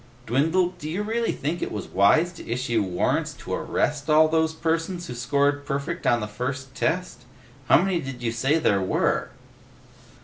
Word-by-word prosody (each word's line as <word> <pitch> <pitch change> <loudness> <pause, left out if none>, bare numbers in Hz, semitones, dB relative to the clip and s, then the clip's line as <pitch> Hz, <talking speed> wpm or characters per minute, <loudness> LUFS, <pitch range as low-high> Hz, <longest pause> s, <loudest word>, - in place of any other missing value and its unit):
"Dwindle, 160 +10 +2
do 155 - -5
you 185 +6 -2
really 230 +2 0
think 155 +5 -3
it - - -3
was 105 - -5
wise 155 - +3
to 170 - -11
issue 120 -1 0
warrants 90 -3 0
to - - -7
arrest 145 +1 -1
all 155 +1 +6
those 160 0 +2
persons 165 +2 -2
who 125 - -6
scored 140 +4 +1
perfect 145 +4 -3
on 120 -1 +3
the 105 - -3
first 130 +5 -5
test? 180 -3 -2 0.5
How - - +7
many 190 -3 0
did 130 -2 -7
you 115 - 0
say 135 +7 +1
there 100 -11 +2
were?" 95 - 0
145 Hz, 175 wpm, -25 LUFS, 120-165 Hz, 0.5 s, How